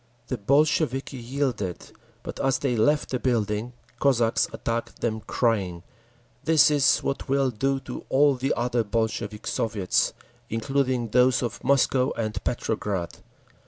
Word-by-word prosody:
The 130 - -1
Bolsheviki 140 +2 +1
yielded, 120 -7 -3 0.3
but - - -7
as 135 -1 +2
they 130 -2 -1
left 145 +7 +2
the 130 - -1
building 115 -1 -1 0.3
Cossacks 120 -5 +2
attacked 115 0 -4
them, 110 -2 -1
crying, 95 -10 -1 0.6
"This 155 -1 +5
is 145 -2 +3
what 140 - -3
we'll 135 -1 +2
do 135 +4 0
to - - -7
all 140 +1 +4
the 130 +1 -2
other 120 0 +1
Bolshevik 110 -1 -2
Soviets, 105 -5 0 0.4
including 125 +1 0
those 125 +2 +3
of 120 - -4
Moscow 135 -1 +2
and 110 -2 -3
Petrograd!" 100 -7 -2
125 Hz, 130 wpm, -25 LUFS, 110-135 Hz, 0.6 s, This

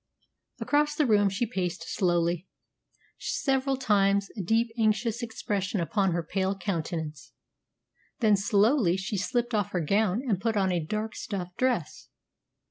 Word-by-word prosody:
Across 295 0 +1
the 300 - +2
room 205 -4 +4
she 200 +5 -1
paced 180 -6 -3
slowly 175 -2 0 0.7
several 270 -1 0
times, 200 -4 +2
a 210 - -3
deep, 225 +6 +1
anxious 225 +1 +1
expression 205 -4 -2
upon 190 +3 +1
her 170 0 -1
pale 190 +3 -1
countenance; 160 -7 -4 0.9
then 215 -3 +4
slowly 200 0 +3
she 190 +2 -3
slipped 240 +3 -1
off 205 -3 0
her 180 - +1
gown 205 - +1
and 195 -5 0
put 225 -1 0
on 190 -2 +2
a 175 -2 0
dark 215 +6 -3
stuff 180 -3 -5
dress. 245 - -1
200 Hz, 140 wpm, -28 LUFS, 180-225 Hz, 0.9 s, room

